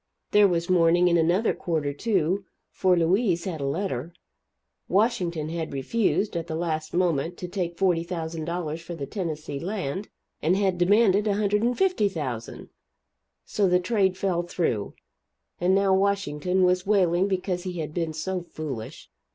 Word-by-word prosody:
There 210 -1 +6
was 170 -2 -1
mourning 175 0 +4
in 170 - +3
another 175 +7 +2
quarter, 155 -4 -2
too, 190 +1 0 0.3
for 185 -2 +2
Louise 175 +1 +2
had 165 -6 -4
a 140 - -1
letter. 165 -1 -3 0.7
Washington 180 -7 +1
had 165 -2 -4
refused, 200 - 0
at 165 -1 -3
the 160 - -3
last 160 -2 -2
moment, 175 -2 0
to 180 - -5
take 175 -2 -3
$40,000 170 -2 -1
for 170 +1 -7
the 145 -4 -5
Tennessee 155 -6 -4
Land, 190 +1 -4 0.3
and 175 +5 +2
had 190 -3 +1
demanded 205 +2 +4
$150,000! 205 - 0 0.8
So 205 -2 +1
the 180 0 +4
trade 190 -1 +1
fell 185 -3 0
through, 165 - -2 0.6
and 180 +2 +3
now 195 -1 +3
Washington 190 -3 +1
was 180 0 +3
wailing 185 -2 +3
because 185 -2 -1
he 185 0 -5
had 155 -2 -4
been 165 -2 -2
so 180 +4 -3
foolish. 145 -9 -7
175 Hz, 145 wpm, -26 LUFS, 160-195 Hz, 0.8 s, There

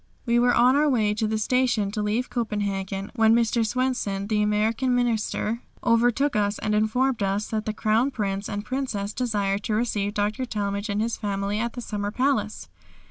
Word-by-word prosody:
We 235 -1 +3
were 245 0 +3
on 250 +2 +5
our 295 +1 +3
way 215 -6 +2
to 215 +1 -1
the 220 0 -1
station 230 -3 +1
to 210 0 -2
leave 215 +4 -1
Copenhagen, 200 -4 -2
when 225 -1 +5
Mr. 235 0 +2
Swenson, 225 -4 -1
the 210 0 0
American 220 +5 +1
Minister, 235 -1 0 0.2
overtook 240 +4 +2
us 205 0 +1
and 215 - -2
informed 225 +3 +1
us 200 +1 -1
that 215 -1 -3
the - - +1
Crown 220 +5 +2
Prince 200 -5 -3
and 205 0 -4
Princess 215 -6 -3
desired 205 -5 -1
to 215 - 0
receive 210 -3 -1
Dr. 210 +5 -1
Talmage 205 -2 -3
and 205 +1 0
his 230 0 -2
family 200 0 -2
at 235 +1 -2
the 245 - -6
summer 205 -3 -3
palace. 220 -3 -1
215 Hz, 185 wpm, -25 LUFS, 205-240 Hz, 0.2 s, on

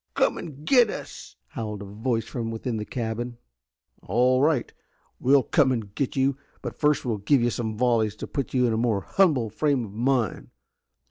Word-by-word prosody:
"Come - - +2
and 150 -3 -9
get 245 -1 +5
us!" - - -8
howled 105 -3 -5
a - - -8
voice 115 +3 -2
from 115 -1 -4
within 115 +1 -3
the 105 - -4
cabin. 120 0 -4 0.6
"All 125 +5 +2
right, 145 -4 +1 0.5
we'll 135 +1 +4
come 130 - +3
and 110 -5 -3
get 135 +2 -2
you, 135 0 +1 0.3
but - - -6
first 150 -3 +2
we'll 115 -3 0
give 120 +5 +3
you 120 - +2
some 110 -2 -3
volleys 115 -3 +2
to - - -6
put 140 - -4
you 125 -1 +4
in 115 - +1
a - - 0
more 115 -4 +1
humble 140 - +2
frame 140 -1 +1
of 100 - -10
mind. 120 +2 0
120 Hz, 190 wpm, -25 LUFS, 110-135 Hz, 0.6 s, get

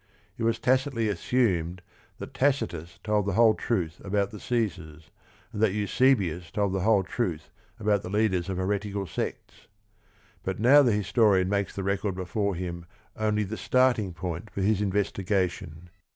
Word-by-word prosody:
It - - -10
was 115 0 +1
tacitly 130 -3 +1
assumed 90 -4 0 0.3
that - - -8
Tacitus 85 - -1
told 105 -2 +1
the 100 - 0
whole 110 +1 +5
truth 90 -9 -2
about 100 0 0
the 105 - -9
Caesars, 85 -10 -3 0.4
and 105 - -4
that 110 -4 +3
Eusebius 100 -6 +1
told 100 +1 -1
the 95 - 0
whole 105 -1 +3
truth 90 -7 -3 0.3
about 105 -2 +1
the - - -7
leaders 95 -3 +1
of 95 - -3
heretical 100 +1 -2
sects. 85 - -6 0.7
But - - -4
now 135 +6 +7
the 125 -4 +3
historian 100 -2 +2
makes 100 -1 -1
the 95 - -3
record 100 0 -1
before 100 +2 -2
him 85 -1 -5 0.3
only 105 -1 0
the 105 +2 -5
starting 125 -6 +2
point 85 +3 -5
for 95 - -5
his 105 +1 +2
investigation. 95 -4 -2
100 Hz, 155 wpm, -27 LUFS, 90-110 Hz, 0.7 s, now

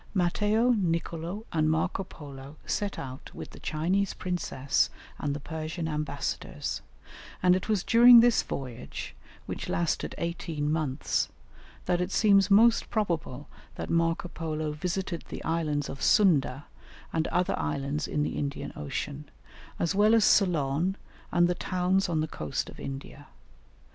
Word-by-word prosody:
Matteo, 210 +6 +2
Nicolo, 170 0 -1
and 155 -1 +2
Marco 160 +4 0
Polo 140 -5 -11
set 205 -1 -2
out 130 0 -8
with - - -8
the - - -12
Chinese 180 +6 0
princess 160 -6 0 0.3
and 145 -1 -1
the - - -4
Persian 160 +2 -4
ambassadors, 150 -1 -3 0.6
and 180 0 +6
it 185 - -3
was 205 -4 +2
during 240 +1 +9
this 240 0 +5
voyage, 125 -4 -6 0.3
which - - -5
lasted 170 -2 -1
eighteen 165 -3 -2
months, 150 -3 0 0.6
that 180 -1 +1
it 180 - -1
seems 200 -2 +4
most 225 +3 +5
probable 170 - -2 0.3
that - - -5
Marco 165 +1 +1
Polo 155 -2 -3
visited 175 +3 -3
the - - -6
islands 155 -3 0
of 135 - -7
Sunda 145 - +3 0.5
and 160 -1 +1
other 180 +1 +1
islands 140 - -2
in 150 - 0
the - - -2
Indian 140 -1 -4
Ocean, 145 0 -5 0.5
as 170 +2 0
well 210 +3 +5
as 220 -2 +5
Ceylon 170 -1 +3 0.4
and 175 0 +4
the 180 - +1
towns 185 +1 0
on 160 -2 +1
the 155 - -1
coast 75 - -4
of - - -14
India. 140 +1 -7
165 Hz, 145 wpm, -28 LUFS, 150-190 Hz, 0.6 s, during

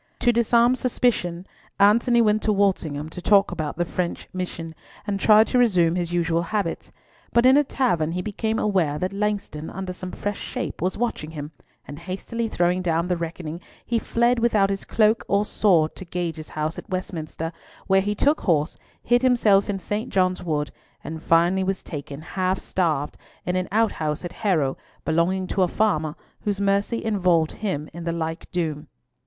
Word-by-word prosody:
To 240 - +4
disarm 235 +1 +4
suspicion, 230 -9 0 0.3
Antony 235 +4 +5
went 215 0 +2
to 215 - +1
Walsingham 175 -7 0
to 180 - -8
talk 200 +1 +4
about 155 -5 -4
the 175 - +1
French 175 0 -3
Mission, 170 -3 -5 0.3
and 200 -2 -2
tried 215 +2 +6
to 250 - +1
resume 180 -9 +4
his 175 -1 -2
usual 170 -1 +1
habits, 205 +4 -3 0.4
but 235 +1 +4
in 260 +1 +7
a 295 - +5
tavern, 175 - 0
he 180 +1 -2
became 220 +2 -2
aware 180 -10 +1
that 185 +5 -2
Langston, 200 -7 -2
under 190 -1 -5
some 185 0 -7
fresh 205 -1 -4
shape, - - -5
was 185 +2 -1
watching 230 -9 -2
him, 150 -1 -7 0.4
and 145 - -8
hastily 195 +6 -4
throwing 180 -2 +1
down 170 -1 0
the 180 - +2
reckoning, 170 0 -5 0.2
he 235 -1 0
fled 235 +2 +1
without 215 -4 +3
his 195 - -3
cloak 220 0 +2
or 200 +1 +2
sword 170 -8 +2
to - - -7
Gage's 170 -3 -4
house 155 +1 -3
at - - -12
Westminster, 165 -3 -4 0.3
where 195 0 +4
he 205 +2 -1
took 290 +8 +2
horse, 155 -3 +1 0.3
hid 240 +1 +3
himself 225 -6 +4
in 200 - 0
St. 205 +4 -3
John's 185 -1 +1
Wood, 150 -4 -2 0.3
and 160 +1 -6
finally 175 +4 +3
was 190 0 -2
taken, 145 -1 -7
half 185 +3 -1
starved, 155 -8 -1 0.3
in 180 - -1
an 185 0 0
outhouse 180 -8 0
at 175 - -6
Harrow, 160 -11 0 0.3
belonging 170 +4 +1
to 195 - 0
a 180 - +4
farmer, 160 -7 0 0.2
whose 205 -2 -2
mercy 200 +3 0
involved 180 -7 +2
him 180 -8 -3
in 170 +1 -7
the 170 - -1
like 165 0 -4
doom. 160 -4 -2
185 Hz, 180 wpm, -24 LUFS, 165-210 Hz, 0.4 s, in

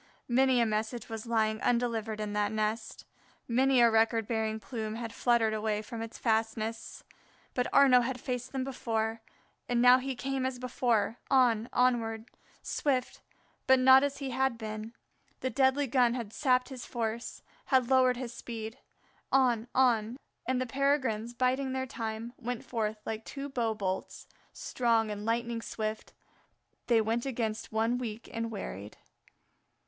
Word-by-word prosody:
Many 260 +1 +3
a 235 - +4
message 220 +2 -2
was 225 0 -6
lying 220 -1 +1
undelivered 230 -3 0
in 210 -1 -3
that 210 0 0
nest, 215 +1 -2 0.4
many 255 +1 +3
a 235 -1 +6
record 225 0 +2
bearing 220 -1 -1
plume 220 0 -5
had 230 0 -5
fluttered 235 -3 +2
away 215 0 -1
from 230 +1 -7
its 225 0 -7
fastness. 225 0 -2 0.5
But 250 -1 -1
Arnaux 260 -3 +6
had 255 +1 -3
faced 250 +1 -4
them 265 -1 -2
before, 225 -4 -2 0.5
and 240 -1 +2
now 250 +1 +7
he 265 0 -4
came 265 +1 -2
as 260 -1 -2
before 240 -3 0
on, 240 -4 +3
onward, 230 -3 +1 0.4
swift, 260 -4 -1 0.5
but 265 - +7
not 260 +1 +7
as 285 -1 -1
he 275 -2 -4
had 260 -1 0
been; 215 +1 -6 0.5
the 260 - -1
deadly 270 +1 +3
gun 250 -2 +3
had 230 -4 -5
sapped 255 -2 +2
his 260 -3 -7
force, 230 -1 -4 0.2
had 260 -2 +2
lowered 255 -1 +4
his 245 -2 -5
speed. 225 +1 -7 0.5
On, 245 -4 +3
on; 240 -2 +3 0.3
and 255 0 +1
the 255 - 0
Peregrines, 255 -4 0
biding 260 +2 0
their 260 0 -1
time, 225 -1 -5
went 245 -1 -5
forth 220 -2 -2
like 220 0 -4
two 280 +3 -6
bow 235 -4 -1
bolts; 190 -2 -4 0.2
strong 230 -3 0
and 210 0 -5
lightning 235 0 -1
swift 215 -1 -4 0.8
they 230 -2 +4
went 230 +4 -1
against 225 -4 -3
one 225 +3 +1
weak 230 -2 -6
and 230 0 -2
wearied. 105 - -7
235 Hz, 155 wpm, -30 LUFS, 220-255 Hz, 0.8 s, now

